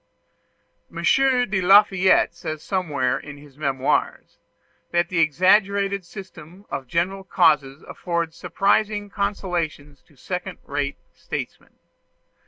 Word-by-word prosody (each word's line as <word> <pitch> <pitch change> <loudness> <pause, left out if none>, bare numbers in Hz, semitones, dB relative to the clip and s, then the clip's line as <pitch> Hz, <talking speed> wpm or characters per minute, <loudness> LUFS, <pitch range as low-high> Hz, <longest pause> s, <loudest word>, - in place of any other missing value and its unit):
M. - - -7
de 250 -7 +2
Lafayette 190 -2 +5
says 155 -3 -6
somewhere 150 -10 -1
in 145 -1 -10
his 145 -2 -16
"Memoirs" 135 -3 -1 0.5
that 175 0 +1
the 185 - -1
exaggerated 195 +4 +2
system 185 0 -12
of 135 - -4
general 185 +7 -1
causes 145 -5 +2
affords 170 -2 -3
surprising 205 +4 0
consolations 175 -8 -3
to 150 - -24
second 180 +6 -5
rate 140 -1 -3 0.2
statesmen. - - -7
175 Hz, 105 wpm, -23 LUFS, 150-195 Hz, 0.5 s, Lafayette